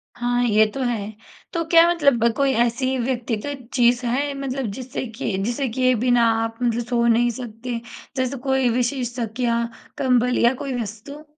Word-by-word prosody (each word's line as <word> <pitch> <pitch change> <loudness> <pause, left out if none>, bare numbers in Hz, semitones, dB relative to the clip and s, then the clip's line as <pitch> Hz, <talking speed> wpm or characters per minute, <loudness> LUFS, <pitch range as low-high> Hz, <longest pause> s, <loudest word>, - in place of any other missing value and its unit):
हाँ, 245 0 0
ये 215 -1 +4
तो 270 - -5
है। 220 -4 -2 0.4
तो 335 -1 0
क्या 335 0 +7
मतलब 280 -9 +3
कोई 275 -1 +2
ऐसी 255 +3 0
व्यक्तिगत 245 +1 -3
चीज़ 245 0 +3
है 280 +4 0
मतलब 270 -1 -3
जिससे 260 +3 -5
कि 220 -4 -3
जिसे 245 +4 -1
किए 255 +2 +2
बिना 245 +1 +3 0.2
आप 225 0 -4
मतलब 235 0 +1
सो 240 -1 +1
नहीं 235 +1 +4
सकते? 235 0 -6 0.4
जैसे 260 +1 -1
कोई 265 -2 +2
विशेष 245 0 -1
तकिया, 235 +1 0 0.3
कंबल 250 -1 +2
या 235 +2 +4
कोई 255 -3 -2
वस्तु? 230 +8 -8
245 Hz, 165 wpm, -22 LUFS, 235-265 Hz, 0.4 s, क्या